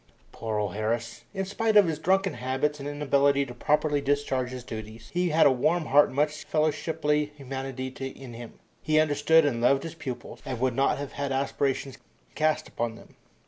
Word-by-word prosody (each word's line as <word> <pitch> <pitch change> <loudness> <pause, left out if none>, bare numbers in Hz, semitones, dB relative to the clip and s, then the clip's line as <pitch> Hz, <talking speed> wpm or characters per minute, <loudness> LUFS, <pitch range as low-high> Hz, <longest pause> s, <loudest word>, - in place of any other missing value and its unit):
Poor 110 -2 -3
old 105 -3 -1
Harris! 115 +2 -3
In 195 -1 -3
spite 215 +3 +1
of 205 - +8
his 160 -3 -2
drunken 190 +3 +2
habits 135 +4 -1
and 140 +1 -4
inability 140 -1 +2
to 125 - -9
properly 145 +3 +1
discharge 135 -3 0
his 125 -1 -7
duties, 110 -1 -8
he 180 0 +1
had 160 +1 +4
a 140 - +7
warm 155 +6 +1
heart 145 +2 +5
and - - -10
much 150 +1 0
fellowshiply 150 -1 +1
humanity 135 -2 -5 0.3
in 130 -3 -10
him. 115 0 -10 0.2
He 155 0 +2
understood 155 +1 +4
and 120 -5 0
loved 135 +3 +3
his 165 - -6
pupils, 135 -7 -7
and 125 - -4
would 130 0 +1
not 135 +2 +2
have 140 -1 -6 0.2
aspersions 135 0 -1 0.3
cast 155 0 +1
upon 115 -1 -3
them. - - -16
140 Hz, 185 wpm, -27 LUFS, 130-155 Hz, 0.3 s, of